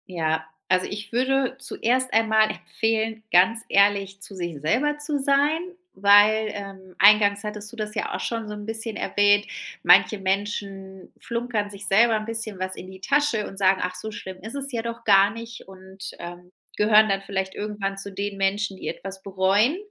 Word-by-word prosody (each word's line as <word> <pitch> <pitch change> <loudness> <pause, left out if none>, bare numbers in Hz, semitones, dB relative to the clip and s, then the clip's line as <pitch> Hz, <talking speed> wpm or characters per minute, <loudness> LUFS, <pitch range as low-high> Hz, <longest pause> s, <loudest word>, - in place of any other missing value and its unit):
Ja, 160 -3 -1 0.2
also, 185 0 +2
ich 205 0 -7
würde 260 +2 0
zuerst 255 -1 -1
einmal 220 -1 +3
empfehlen, 225 -1 -2
ganz 225 +6 +4
ehrlich 200 -1 +2
zu 195 - -9
sich 175 -5 -5
selber 265 - +1
zu 295 -1 -2
sein, 285 +3 +2 0.3
weil, 205 +2 +5
ähm, 195 -2 -9
eingangs 205 0 +5
hattest 210 0 -6
du - - -12
das 215 -2 -5
ja 215 - -3
auch - - -4
schon 230 -2 -3
so 210 - -6
'n 210 0 -8
bisschen 225 0 -5
erwähnt, 205 0 +2 0.4
manche 215 - +5
Menschen 195 -1 -4
flunkern 235 -3 -3
sich 200 0 -9
selber 225 +4 +4
'n 215 0 -3
bisschen 225 -2 -5
was 185 0 -4
in 185 - -9
die 190 0 -13
Tasche 280 -4 +1
und 195 - -11
sagen: 190 -1 +3
„Ach, 180 0 -3
so 220 - -6
schlimm 190 -3 -8
ist 220 +6 -8
es 275 0 -4
ja 235 -3 -2
doch 235 0 -6
gar 200 -2 +5
nicht" 230 +1 -10
Und, 190 0 -10
ähm, 175 +1 -10 0.3
gehören 215 0 +5
dann 195 0 0
vielleicht 190 -1 -3
irgendwann 205 -2 -4
zu 200 +1 -7
den 200 +1 -4
Menschen, 195 0 -1
die - - -7
etwas 190 0 -6
bereuen. 195 - +2
205 Hz, 185 wpm, -24 LUFS, 195-225 Hz, 0.4 s, weil